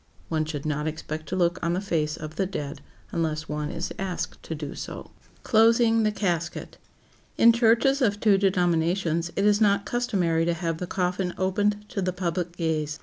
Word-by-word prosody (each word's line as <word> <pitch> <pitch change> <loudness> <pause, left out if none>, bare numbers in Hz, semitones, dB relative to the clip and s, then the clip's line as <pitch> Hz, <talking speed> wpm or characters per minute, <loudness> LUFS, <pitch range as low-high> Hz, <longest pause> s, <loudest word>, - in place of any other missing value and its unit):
One 155 -1 0
should 150 -2 -5
not 150 0 -1
expect 155 0 -5
to 185 - -2
look 175 -1 +1
on 170 0 +1
the 180 - 0
face 160 -6 -1
of 155 +1 -7
the 190 +2 0
dead 145 -6 -5 0.3
unless 160 -1 -2
one 150 0 -3
is 170 +1 -4
asked 190 -2 -4
to 165 - -5
do 145 -2 -6
so. - - -6
[Sidenote: - - -14
CLOSING 230 0 +4
THE 215 -1 +2
CASKET] 175 -6 -3 0.6
In 230 0 +7
churches 235 +4 +3
of 205 -5 +2
two 205 -3 +4
denominations 175 -2 +1
it 200 - +1
is 210 +1 +4
not 200 -1 +3
customary 190 -9 0
to 170 0 +1
have 165 -1 -2
the 180 - -4
coffin 180 0 -1
opened 205 +2 0
to 195 - -3
the 185 -1 -1
public 175 -1 -3
gaze. 155 -3 -1
180 Hz, 190 wpm, -26 LUFS, 160-205 Hz, 0.6 s, In